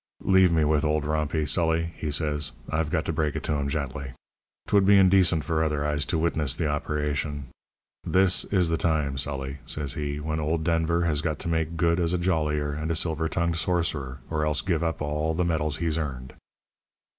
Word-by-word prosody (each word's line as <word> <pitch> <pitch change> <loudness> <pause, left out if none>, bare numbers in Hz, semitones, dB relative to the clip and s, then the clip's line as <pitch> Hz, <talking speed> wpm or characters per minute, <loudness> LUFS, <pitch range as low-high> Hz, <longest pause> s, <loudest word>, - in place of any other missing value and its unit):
"'Leave 95 -2 +5
me 80 -2 +2
with 75 0 +2
old 75 -1 0
Rompey, 75 0 -1
Sully,' 80 0 +1
he 75 - -4
says. 75 -1 0 0.2
'I've 80 -1 0
got 80 -1 -1
to 80 - -2
break 75 -1 -1
it - - -4
to - - -1
him 70 -1 -1
gently. 70 -2 -4 0.5
'Twould 100 -1 +3
be 100 +1 +6
indecent 95 -4 +4
for 80 +1 0
other 75 -2 -1
eyes 75 -2 0
to - - 0
witness 80 -4 0
the 80 - -2
operation. 75 -1 -2 0.6
This 95 -1 +3
is 90 -4 +1
the 80 - +1
time, 75 -4 0
Sully,' 70 0 -2
says 70 -3 -2
he, 75 -1 -3
'when 80 +1 -3
old 80 +1 -1
Denver 85 +1 +1
has 75 -3 0
got 80 -2 -2
to - - -7
make 80 0 -1
good 85 +1 +2
as 85 0 +1
a - - +2
jollier 75 -4 0
and 80 +2 -4
a 85 - 0
silver 80 0 0
tongued 85 0 -1
sorcerer, 80 -7 -1
or 75 -1 -1
else 75 -2 +2
give 85 -3 -1
up 80 -2 -2
all 75 +2 -1
the 90 +1 0
medals 75 -3 0
he's 80 -1 -1
earned.' 65 -4 -5
80 Hz, 205 wpm, -26 LUFS, 75-85 Hz, 0.6 s, be